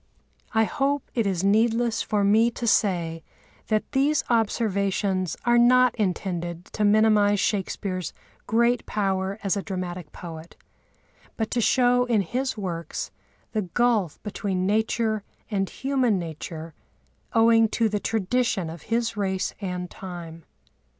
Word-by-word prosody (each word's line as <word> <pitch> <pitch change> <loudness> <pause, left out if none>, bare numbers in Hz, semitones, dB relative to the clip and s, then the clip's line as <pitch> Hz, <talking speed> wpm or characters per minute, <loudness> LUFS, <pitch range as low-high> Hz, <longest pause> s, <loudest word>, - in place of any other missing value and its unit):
I 220 0 +4
hope 275 +4 0
it 230 -4 +1
is 190 -2 -1
needless 225 +3 +2
for 210 -2 0
me 220 +4 +4
to 235 0 -5
say 175 -7 +1 0.5
that 215 -1 0
these 285 +3 +2
observations 200 -5 0
are 240 0 +5
not 250 +1 +5
intended 175 -4 -2
to 215 - -1
minimise 210 -1 +4
Shakespeare's 190 -3 -2 0.4
great 235 +1 +2
power 195 -1 -1
as 195 -1 +1
a 200 - -1
dramatic 180 -5 -5
poet, 165 -1 -9 0.8
but 220 -1 -2
to 245 - +1
show 245 +1 +3
in 230 -4 +2
his 255 +7 -2
works 170 -5 -4 0.4
the 215 - 0
gulf 210 -2 +1
between 195 -3 -2
Nature 220 +1 +1 0.3
and 195 -2 0
human 260 -5 +1
nature 160 -1 -6 0.6
owing 225 -1 +5
to 225 +1 +1
the 210 -1 -1
tradition 220 -4 0
of 165 -1 -9
his 230 -1 0
race 190 -2 -1
and 180 -2 -3
time. 170 -4 -9
205 Hz, 130 wpm, -25 LUFS, 185-230 Hz, 0.8 s, are